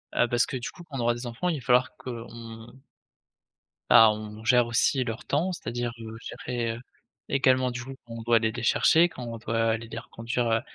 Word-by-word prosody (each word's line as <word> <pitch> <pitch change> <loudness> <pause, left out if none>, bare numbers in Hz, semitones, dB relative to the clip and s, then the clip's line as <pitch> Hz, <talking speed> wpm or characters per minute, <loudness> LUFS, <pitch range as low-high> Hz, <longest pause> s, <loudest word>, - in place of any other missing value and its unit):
Heu, 120 - +3
parce 120 0 +2
que 130 - -4
du 120 - -5
coup, 175 - -13
quand 150 -5 -8
on - - -3
aura 120 0 +2
des 120 - -7
enfants 120 +10 -2
il 165 - 0
va 120 - -14
falloir 125 +1 +3
qu'on 120 -2 -7 1.6
bah, 110 -1 +9
on 105 0 -8
gère 120 +1 +4
aussi 130 +3 +2
leur 115 -2 -4
temps, 160 +6 0
c'est-à-dire, 120 -8 -3
heu, 110 -1 -8 0.3
gérer, 120 -2 -2
heu, 115 - -10 0.5
également 130 -2 +3
du 125 0 -5
coup, 135 +1 -8
quand 115 - -9
on - - -6
doit 115 0 +4
les 110 0 0
chercher, 165 +8 +4
quand 130 -7 -9
on 115 - -5
doit 115 0 -1
aller 115 +1 -4
les 115 - -6
reconduire, 115 +1 -3
heu, 115 0 +2
120 Hz, 220 wpm, -27 LUFS, 115-130 Hz, 1.6 s, bah